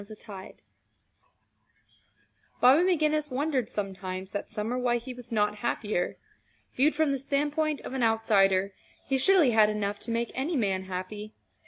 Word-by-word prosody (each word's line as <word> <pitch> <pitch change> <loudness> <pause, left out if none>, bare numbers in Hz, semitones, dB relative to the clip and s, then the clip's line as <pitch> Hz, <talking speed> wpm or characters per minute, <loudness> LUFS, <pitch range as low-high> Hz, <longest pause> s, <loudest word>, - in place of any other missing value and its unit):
CHAPTER 210 +2 -11
XXXVI 200 -3 -10 2.1
Bobby 260 +6 +6
McGinnis 310 -4 +1
wondered 265 -3 -1
sometimes 190 -2 -5
that 205 - -4
summer 215 +3 -3
why 245 -1 +1
he 245 +2 -7
was 245 -1 -11
not 210 -1 +1
happier. 210 -4 -2 0.6
Viewed 290 +4 +3
from 310 -1 +2
the 275 - -1
standpoint 295 +2 -1
of - - -7
an 265 - -2
outsider, 200 -4 +3 0.3
he 270 -1 0
surely 345 -3 +5
had 215 -2 +5
enough 205 -1 -2
to - - -7
make 230 0 -1
any 290 +6 -2
man 195 -6 0
happy. 190 +3 -6
230 Hz, 150 wpm, -28 LUFS, 205-275 Hz, 2.1 s, Bobby